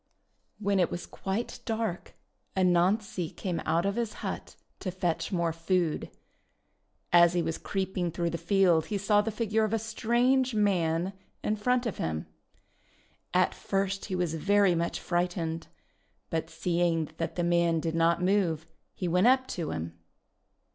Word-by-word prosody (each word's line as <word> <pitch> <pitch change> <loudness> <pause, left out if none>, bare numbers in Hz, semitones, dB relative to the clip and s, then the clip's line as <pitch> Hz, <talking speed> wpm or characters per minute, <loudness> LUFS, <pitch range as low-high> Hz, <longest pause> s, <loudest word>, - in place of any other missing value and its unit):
When 200 -2 +1
it 175 - +3
was 175 - -5
quite 225 +6 -4
dark 220 -6 -3 0.4
Anansi 185 0 +2
came 180 -4 -2
out 165 +3 +2
of 200 +2 0
his 230 -3 -1
hut - - -5 0.2
to 190 - -3
fetch 175 -1 -2
more 170 -3 0
food. 165 0 0 1.0
As 170 0 +7
he 175 -1 +1
was 165 0 -2
creeping 190 -2 -2
through 170 0 -1
the 170 - -3
field 175 -2 +3
he 210 - -1
saw 205 +1 +3
the 215 - -2
figure 220 0 0
of 215 0 0
a - - +3
strange 240 +3 +1
man 180 -3 +1 0.3
hi 210 - +2
front 250 +4 +1
of 230 - -2
him. 80 -1 -2 1.1
At - - +3
first 195 0 -2
he 185 - -3
was 175 -3 0
very 200 +3 +3
much 170 0 -1
frightened, 175 -2 -1 0.6
but 165 -1 -1
seeing 170 -3 0
that 165 - -3
the 175 - 0
man 170 -1 +3
did 160 0 -2
not 165 +1 +2
move, 180 -5 +1 0.3
he 180 - -3
went 180 +6 +3
up 260 +1 +5
to 165 -4 -3
him. 80 0 -5
180 Hz, 155 wpm, -29 LUFS, 170-205 Hz, 1.1 s, As